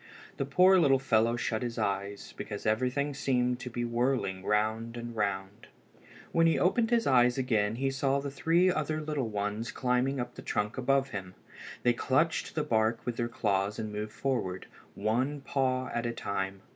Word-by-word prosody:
The 135 - -2
poor 185 +6 +6
little 140 -5 +5
fellow 115 -3 +2
shut 110 -2 -2
his 120 -2 -4
eyes, 100 -1 -3
because 105 -1 -6
everything 130 +6 0
seemed 125 -3 0
to 125 0 -6
be 120 0 -3
whirling 120 -5 0
round 110 +3 0
and 120 0 -6
round. 100 -2 -3 0.6
When 165 0 +4
he 165 - +3
opened 225 +5 +2
his 235 -1 +2
eyes 125 -2 +4
again 110 -5 +1
he 135 +2 0
saw 135 +1 +1
the 140 0 -5
three 170 +6 +3
other 155 -2 -1
little 150 -6 -2
ones 105 +2 -3
climbing 125 +2 0
up 120 0 -4
the - - -10
trunk 105 +1 -2
above 135 +1 +1
him. 95 -2 -6 0.5
They 120 - +4
clutched 145 +7 0
the 155 - +1
bark 110 -1 +1
with 120 -1 -3
their 120 -1 -1
claws 100 -3 0
and 110 -2 -4
moved 105 +1 -4
forward, 110 -9 -2 0.3
one 125 +8 0
paw 130 -2 0
at 120 0 -1
a 120 - -2
time. 95 -2 -3
120 Hz, 180 wpm, -30 LUFS, 110-135 Hz, 0.6 s, poor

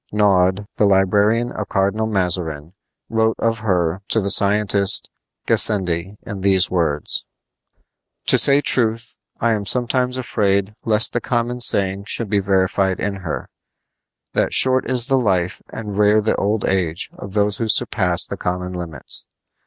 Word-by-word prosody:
Naude, 100 -1 +1
the 105 - +3
librarian 105 +4 +2
of 105 - -6
Cardinal 100 +3 0
Mazarin, 90 -6 -1 0.3
wrote 110 0 0
of 115 -1 -1
her 90 -4 -1
to 115 - +1
the 100 -1 -2
scientist 100 -1 +2 0.4
Gassendi 95 -2 0
in 100 -4 -7
these 95 -1 +3
words: 80 -5 0 1.0
To - - +4
say 140 +1 +4
truth, 115 -3 0 0.3
I 115 - +1
am 105 -2 -3
sometimes 125 +1 +1
afraid 100 -5 -1
lest 110 0 +4
the 120 - -1
common 120 +1 -2
saying 100 -3 +2
should 110 -1 -3
be 100 - +2
verified 95 0 0
in 100 0 -3
her, 90 -5 -6 0.9
that - - 0
short 130 0 +3
is 125 -2 +3
the 135 -1 +1
life 95 -6 -1
and 105 -2 -7
rare 105 +1 +3
the 110 +1 0
old 105 +1 -1
age 90 -3 -2
of 100 - -7
those 105 -1 0
who 115 - -2
surpass 95 -6 +2
the 100 - -7
common 90 0 -4
limits. 85 -6 -6
100 Hz, 150 wpm, -19 LUFS, 95-110 Hz, 1.0 s, To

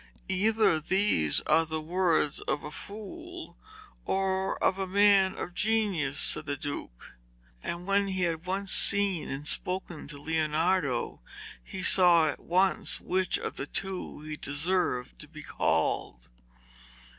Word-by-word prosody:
'Either 210 -2 +2
these 160 - +2
are 165 - +3
the 160 0 -3
words 165 -2 +1
of 145 - -1
a 150 - -7
fool, 335 - -8 0.5
or 190 0 0
of 190 - +1
a 190 - -2
man 195 -1 +4
of 180 - -5
genius,' 195 -9 0
said 155 - -1
the 145 0 -2
Duke. 145 - -7 0.5
And 170 +1 -5
when 200 +1 +2
he 190 -1 -1
had 165 0 -2
once 195 +1 -2
seen 200 -4 +2
and 140 +2 -4
spoken 180 -2 -2
to 145 -1 -7
Leonardo 155 - 0 0.4
he 185 - -7
saw 175 -3 +6
at 145 - -3
once 185 +3 +1
which 185 0 0
of - - -5
the 135 - -4
two 190 -4 -4
he 155 0 -6
deserved 145 -3 -1
to 150 - -9
be 150 0 -10
called. - - -1
180 Hz, 140 wpm, -29 LUFS, 150-195 Hz, 0.5 s, saw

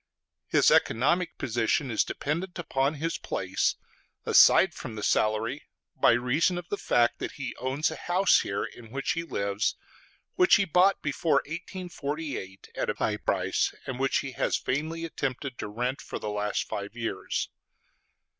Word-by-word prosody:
His - - +4
economic 170 +10 +2
position 120 +3 0
is 110 - +3
dependent 170 +5 -3
upon 140 -3 0
his 165 +3 -2
place, 95 0 -1 0.5
aside 185 -3 +6
from 120 -7 -7
the 105 - -5
salary, 110 +6 +1 0.3
by - - +5
reason 130 +9 +2
of 175 -1 -6
the 205 - -1
fact 120 -1 +2
that - - -4
he - - -5
owns 130 +4 -1
a - - -5
house 185 +2 +3
here 100 - -2
in 115 -2 -9
which 135 +4 -2
he 170 - -1
lives, 100 -9 -1 0.6
which 365 -1 +5
he 200 - +3
bought 185 +3 +3
before 150 +2 +1
1848 155 - -6
at - - -1
a - - 0
high - - 0
price, - - 0
and 130 -1 -5
which 135 0 +2
he 135 - -6
has 125 - 0
vainly 160 +5 -2
attempted 135 -4 -4
to - - -3
rent 125 +6 -2
for - - -6
the 105 - -4
last 105 0 -1
five 100 +2 -5
years. 110 -5 -3
135 Hz, 160 wpm, -28 LUFS, 115-165 Hz, 0.6 s, aside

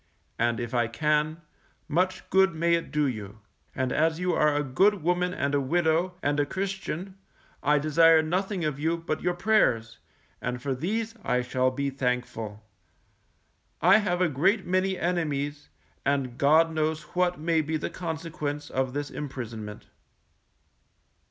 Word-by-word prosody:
And 115 0 +1
if 120 0 -4
I 120 -2 +2
can, 150 +5 0 0.5
much 185 +4 0
good 190 -3 +4
may 170 +1 +2
it 170 0 0
do 150 -1 +1
you; 105 -5 -4 0.4
and 130 -1 -1
as 160 +1 +1
you 180 0 0
are 150 -1 +3
a 145 - +1
good 185 +8 +2
woman 180 +1 +1
and 140 -5 -1
a 145 - +2
widow, 170 +5 +1
and 145 +1 +1
a 145 - +3
Christian, 190 0 -4 0.4
I 150 +1 +3
desire 160 +2 +5
nothing 185 +2 -1
of 145 -2 -2
you 165 +3 0
but 165 -2 -3
your 180 0 0
prayers, 115 - +2 0.4
and 125 0 -3
for 135 +2 -2
these 215 - -2
I 125 0 +1
shall 130 +1 +1
be 140 +2 -2
thankful. 125 -5 -3 1.2
I 185 +6 +6
have 180 -4 -1
a 180 - +4
great 190 - +1
many 185 +1 +1
enemies, 145 -5 -2 0.3
and 135 -3 0
God 160 +5 +4
knows 155 0 -1
what 180 -1 +1
may 160 0 +2
be 155 +1 -2
the 150 - -4
consequence 160 -4 -4
of 130 -1 -1
this 145 0 -3
imprisonment. 115 -7 -6
155 Hz, 155 wpm, -27 LUFS, 135-175 Hz, 1.2 s, I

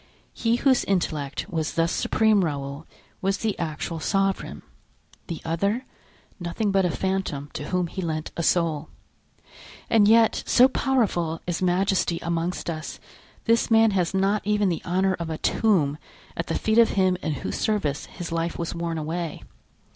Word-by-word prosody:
He 230 0 +1
whose 260 +1 +3
intellect 155 -7 -1
was 160 -5 -3
thus 165 +1 +2
supreme, 215 -3 +2
Raoul, 140 -1 -4 0.3
was 195 +1 +1
the 220 -3 -1
actual 165 0 -3
sovereign; 195 +3 -1 0.6
the 165 -4 -5
other, 200 +10 0 0.5
nothing 190 +4 -1
but 195 -1 +3
a - - +2
phantom 180 -6 -2
to 145 - -5
whom 180 -1 0
he 190 +3 -5
lent 160 -2 -3
a - - -2
soul; 165 -3 +1 1.0
and 215 -3 +5
yet, 225 +1 +5
so 250 +1 +6
powerful 205 -12 0
is 175 0 -2
majesty 185 -1 +1
amongst 170 +1 -2
us, 160 -2 -5 0.5
this 230 0 +3
man 225 -1 +5
has 180 -4 +1
not 195 +2 +1
even 210 -1 +2
the 170 - -2
honor 190 +2 +1
of 170 -1 -4
a 160 - -3
tomb 155 -11 +1 0.4
at - - -3
the - - -1
feet 220 +1 +2
of 230 - +6
him 185 -1 +3
in 155 - -1
whose 140 - -4
service 155 -10 -1
his 175 -1 -7
life 165 0 -2
was 170 - -3
worn 170 -1 -3
away. 160 +1 -4
180 Hz, 160 wpm, -25 LUFS, 165-205 Hz, 1.0 s, so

